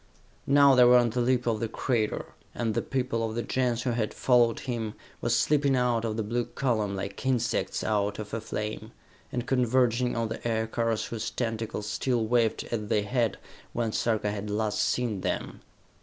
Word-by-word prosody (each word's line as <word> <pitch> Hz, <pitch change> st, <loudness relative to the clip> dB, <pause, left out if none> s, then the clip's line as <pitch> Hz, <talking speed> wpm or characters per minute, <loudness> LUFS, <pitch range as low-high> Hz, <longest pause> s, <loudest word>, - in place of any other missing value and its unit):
Now 140 Hz, 0 st, +6 dB
they 125 Hz, -1 st, +7 dB
were 125 Hz, 0 st, +7 dB
on 120 Hz, -2 st, +3 dB
the 125 Hz, +2 st, 0 dB
lip 125 Hz, 0 st, +1 dB
of 115 Hz, -2 st, 0 dB
the 115 Hz, -, -1 dB
crater, 115 Hz, -1 st, -1 dB, 0.2 s
and 115 Hz, -2 st, -1 dB
the -, -, 0 dB
people 125 Hz, -3 st, -1 dB
of 110 Hz, 0 st, -3 dB
the 120 Hz, -, -1 dB
Gens 125 Hz, -2 st, 0 dB
who 125 Hz, -, 0 dB
had 115 Hz, -2 st, -2 dB
followed 120 Hz, -3 st, +3 dB
him, 115 Hz, -4 st, -3 dB, 0.3 s
were -, -, -1 dB
slipping 140 Hz, -2 st, +3 dB
out 120 Hz, -2 st, +1 dB
of 110 Hz, -1 st, -2 dB
the 110 Hz, -, 0 dB
blue 120 Hz, +3 st, -1 dB
column, 110 Hz, -7 st, -1 dB
like 100 Hz, +1 st, -5 dB
insects 125 Hz, -3 st, 0 dB
out 105 Hz, -1 st, 0 dB
of 105 Hz, -1 st, -7 dB
a 115 Hz, -, -2 dB
flame, 110 Hz, 0 st, -5 dB, 0.4 s
and 125 Hz, -1 st, -2 dB
converging 125 Hz, -1 st, +2 dB
on 115 Hz, -1 st, -1 dB
the 110 Hz, +1 st, -4 dB
aircars 110 Hz, 0 st, 0 dB
whose 115 Hz, -1 st, -4 dB
tentacles 115 Hz, -3 st, -3 dB
still 115 Hz, +2 st, 0 dB
waved 115 Hz, -1 st, +1 dB
as 105 Hz, -3 st, -2 dB
they 105 Hz, 0 st, +1 dB
had 115 Hz, 0 st, 0 dB, 0.4 s
when 115 Hz, -2 st, -1 dB
Sarka 110 Hz, -2 st, 0 dB
had 105 Hz, 0 st, -5 dB
last 105 Hz, 0 st, -1 dB
seen 115 Hz, -6 st, 0 dB
them. -, -, -3 dB
115 Hz, 185 wpm, -28 LUFS, 110-125 Hz, 0.4 s, they